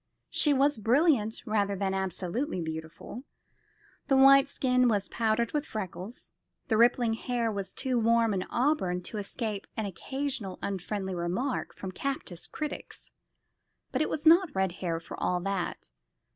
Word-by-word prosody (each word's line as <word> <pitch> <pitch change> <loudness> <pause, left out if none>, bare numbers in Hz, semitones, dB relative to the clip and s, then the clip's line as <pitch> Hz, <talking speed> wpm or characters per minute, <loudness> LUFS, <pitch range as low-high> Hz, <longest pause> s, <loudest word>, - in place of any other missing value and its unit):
She 295 - +3
was 280 -2 +3
brilliant 235 -1 +2
rather 205 -3 +1
than 190 0 -1
absolutely 190 - -2
beautiful. 160 +8 -6 0.8
The 270 - +4
white 275 +1 +8
skin 250 -2 +2
was 205 -4 +1
powdered 225 0 +1
with 295 -1 0
freckles. 210 - -7 0.4
The 220 - +3
rippling 235 0 +4
hair 230 0 -1
was 200 -2 -4
too 255 -2 -1
warm 230 -1 +3
an 190 - 0
auburn 235 -10 +1
to 215 - -4
escape 205 0 -4
an 220 - -1
occasional 245 0 -3
unfriendly 195 0 -3
remark 180 +10 -2
from 190 - -6
captious 190 -6 -4
critics; 305 -1 -6 0.8
but 260 - 0
it 310 - +1
was 305 +1 -3
not 335 -1 +6
red 190 -1 +1
hair 165 -3 -1
for 165 - -9
all 180 - +1
that. 190 - -3
220 Hz, 145 wpm, -29 LUFS, 190-265 Hz, 0.8 s, white